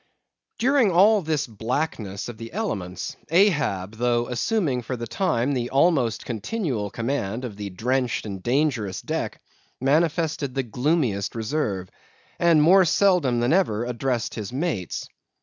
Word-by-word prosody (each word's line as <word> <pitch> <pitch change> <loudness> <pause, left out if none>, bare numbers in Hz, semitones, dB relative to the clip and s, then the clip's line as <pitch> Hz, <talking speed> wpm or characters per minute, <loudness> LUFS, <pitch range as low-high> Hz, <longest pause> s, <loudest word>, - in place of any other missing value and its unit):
During 250 -1 +3
all 200 +4 +5
this 155 -4 -1
blackness 110 -3 -3
of 120 -3 -8
the 115 +4 -8
elements, 100 - -3
Ahab, 150 - +2
though 120 0 +1
assuming 135 - 0
for 125 +2 -4
the 115 - -4
time 130 - 0
the 125 -2 -1
almost 135 -5 +2
continual 120 - -2
command 115 0 -2
of 110 -5 -6
the 100 0 -5
drenched 125 +6 -1
and 100 -3 -6
dangerous 125 -6 0
deck, - - -3 0.4
manifested 150 -1 +1
the 135 - 0
gloomiest 125 -4 0
reserve; 110 -6 -2 0.5
and 165 -3 +5
more 185 +4 +7
seldom 170 -8 +3
than 120 +5 +2
ever 120 - +2
addressed 125 -1 -2
his 110 -2 -5
mates. 130 - -3
125 Hz, 135 wpm, -24 LUFS, 110-160 Hz, 0.5 s, more